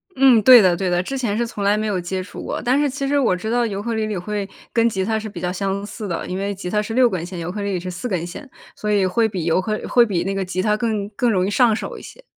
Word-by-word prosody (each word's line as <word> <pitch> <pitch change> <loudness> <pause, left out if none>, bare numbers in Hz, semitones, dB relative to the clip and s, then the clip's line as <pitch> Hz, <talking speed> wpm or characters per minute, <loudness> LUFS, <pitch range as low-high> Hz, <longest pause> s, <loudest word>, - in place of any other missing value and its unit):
嗯， 260 -4 +6
对 250 +1 +9
的， 185 -3 +4
对 185 +1 -1
的， 175 +1 +1
之 270 +7 -4
前 220 -5 -1
是 235 - +1
从 205 -3 -5
来 205 +1 +3
没 215 - -1
有 200 -4 -1
接 185 +1 -3
触 - - -9
过。 - - -4
但 255 +4 +2
是 290 -1 +2
其 275 +1 -3
实 285 0 +2
我 225 -9 +2
知 220 +5 -4
道 240 0 +2
尤 200 -2 -3
克 230 0 -2
里 220 -1 -1
里 210 -3 -3
会 200 +2 -4 0.2
跟 230 0 +3
吉 190 -3 -2
他 220 0 0
是 215 - -6
比 180 - -8
较 180 0 -1
相 195 +1 -2
似 215 0 -7
的， 170 - -3
因 185 - -3
为 200 +1 -2
吉 180 -2 -6
他 210 +2 +1
是 225 +2 -5
6 250 0 +5
根 180 -3 -3
弦， 180 0 -8
尤 170 +1 -4
克 210 - -5
里 200 -1 -2
里 180 - -1
是 180 +1 -6
4 180 +8 -5
根 180 -6 -2
弦， 260 +11 -9 0.3
所 210 0 -3
以 200 -2 +3
会 220 +5 +2
比 185 -5 -4
尤 170 +2 +2
克 215 +2 -2
会 240 -1 +5
比 180 -5 -1
那 195 - -2
个 195 0 -1
吉 185 0 -2
他 210 +2 +2
更 215 -3 -1
更 235 +3 0
容 185 -2 +1
易 - - -1
上 235 -1 +4
手 - - -6
一 - - -10
些。 - - -13
205 Hz, 340 characters per minute, -21 LUFS, 185-230 Hz, 0.3 s, 对